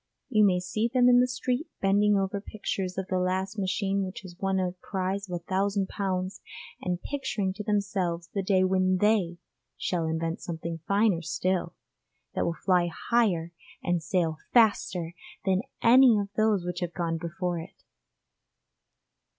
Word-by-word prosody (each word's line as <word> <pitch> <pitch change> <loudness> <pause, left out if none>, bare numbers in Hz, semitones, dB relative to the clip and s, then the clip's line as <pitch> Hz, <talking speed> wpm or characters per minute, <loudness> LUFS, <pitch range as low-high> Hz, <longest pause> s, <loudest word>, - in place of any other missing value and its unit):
You 215 -5 +4
may 185 -3 +4
see 200 +5 -1
them 250 -1 +4
in 245 0 +7
the 250 - +4
street 255 +3 -2
bending 205 +1 +3
over 195 +1 -1
pictures 195 -3 -4
of 190 - -2
the 185 0 -1
last 190 +3 -1
machine 195 +1 0
which 185 0 -6
has 185 -3 -11
won 195 -1 0
a 180 -1 0
prize 190 0 -3
of 180 - -2
a 170 - -6
thousand 195 +1 0
pounds, 185 -1 -2 0.4
and 180 -1 -2
picturing 260 -9 -2
to 210 +2 -6
themselves 195 -5 -1
the 200 - 0
day 190 -1 +3
when 185 0 +2
they 195 -4 +2 0.4
shall 170 -3 -1
invent 165 +1 -2
something 165 -1 -5
finer 200 -3 +3
still, 185 +2 -1 0.6
that - - 0
will 170 - 0
fly 180 -2 +4 0.2
higher 180 -8 +2 0.3
and 175 -2 0
sail 165 -2 0
faster 195 -7 +3 0.3
than 190 -1 +2 0.2
any 245 -1 +7
of 200 -1 -2
those 215 -4 +2
which 180 0 -3
have 175 -2 -3
gone 165 -2 -1
before 170 +1 -3
it. 170 +4 -11
190 Hz, 160 wpm, -28 LUFS, 180-205 Hz, 0.6 s, in